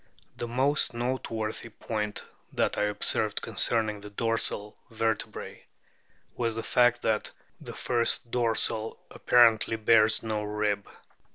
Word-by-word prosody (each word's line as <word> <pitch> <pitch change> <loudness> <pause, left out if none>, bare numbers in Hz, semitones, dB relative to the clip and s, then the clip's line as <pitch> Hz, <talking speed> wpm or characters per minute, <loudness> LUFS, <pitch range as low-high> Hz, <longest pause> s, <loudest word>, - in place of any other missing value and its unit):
The 120 - -4
most 130 +2 +1
note 125 +2 -2
worthy 110 +1 -3
point 105 -1 -4 0.3
that - - 0
I 105 - +1
observed 105 0 0
concerning 110 -1 +1
the 105 +1 -10
dorsal 105 -1 -1
vertebrae 110 -1 -3 0.7
was 115 -2 -1
the 115 - -3
fact 120 -1 +3
that 110 -1 0 0.3
the - - -9
first 120 -1 0
dorsal 115 -2 0
apparently 115 -2 +4
bears 110 -1 +4
no 110 -1 -2
rib. 105 -1 -2
110 Hz, 120 wpm, -28 LUFS, 105-115 Hz, 0.7 s, apparently